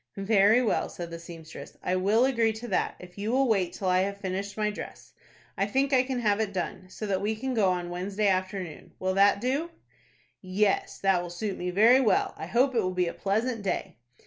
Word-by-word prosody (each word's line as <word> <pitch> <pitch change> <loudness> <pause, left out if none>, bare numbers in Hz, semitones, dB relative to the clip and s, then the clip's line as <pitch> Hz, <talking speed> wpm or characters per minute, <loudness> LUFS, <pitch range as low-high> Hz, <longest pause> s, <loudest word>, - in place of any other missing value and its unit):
"Very 205 +4 +4
well," 225 - 0
said 170 -1 -7
the 170 - -6
seamstress, 165 -1 -11
"I 180 - 0
will 205 +6 +3
agree 230 -4 +2
to 225 +2 -8
that, 190 - 0
if 180 +2 -12
you 210 +3 -2
will 265 +1 +3
wait 190 -6 +1
till 190 - -4
I 185 0 +3
have 200 +1 -1
finished 195 +1 -4
my 210 -1 +1
dress. - - -9 0.4
I 195 - 0
think 270 +6 +1
I 255 - +6
can 255 -1 -3
have 210 -2 +2
it 215 -3 -1
done, 185 0 -4
so 215 - -6
that 195 -2 -1
we 215 +2 0
can 260 +4 -3
go 210 -5 +3
on 175 -1 -2
Wednesday 195 +4 -1
afternoon. 185 -3 -2
Will 185 0 -1
that 200 +1 +4
do?" 270 +8 -1 0.7
"Yes, 195 +2 0
that 195 -2 +3
will 175 - -6
suit 190 +3 -4
me 180 - -3
very 225 +8 +5
well. 225 - +2
I - - -7
hope 260 +3 +2
it 230 - +2
will 185 -2 -2
be 180 -1 +2
a - - -7
pleasant 220 +4 -1
day." 190 -2 -3
200 Hz, 225 wpm, -27 LUFS, 185-225 Hz, 0.7 s, I